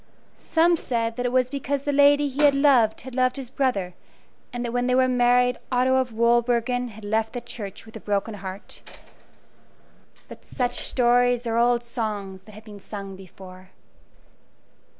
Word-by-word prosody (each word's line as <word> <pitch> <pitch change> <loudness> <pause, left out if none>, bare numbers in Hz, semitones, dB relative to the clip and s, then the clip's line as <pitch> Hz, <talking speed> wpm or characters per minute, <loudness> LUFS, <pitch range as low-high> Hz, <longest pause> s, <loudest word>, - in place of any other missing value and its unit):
Some 335 +1 +2
said 230 -5 -2
that 245 +1 -2
it - - -3
was 255 0 +1
because 280 0 -3
the 290 - -1
lady 285 +1 +4
he 280 +1 -3
had 290 -2 +5
loved 265 -6 +3
had 260 +1 -10
loved 255 0 +1
his 260 -3 -7
brother, 210 -11 -1 0.6
and 245 0 -4
that 235 - -3
when 245 0 0
they 250 - +2
were 260 0 +3
married 245 0 +2
Otto 255 +1 +2
of 260 -2 -1
Wolbergen 240 +2 +1
had 220 -2 -12
left 220 +2 -1
the 245 - -3
church 205 -5 -9
with 220 - -15
a - - -6
broken 205 +1 -2
heart. 195 -1 -9 1.5
But - - -13
such 245 -2 -2
stories 245 0 +2
are 230 0 0
old 240 0 +2
songs 205 -5 -5
that 215 - -15
have 215 +1 -13
been 205 -2 -11
sung 195 -1 -8
before. 185 0 -14
245 Hz, 170 wpm, -24 LUFS, 220-255 Hz, 1.5 s, had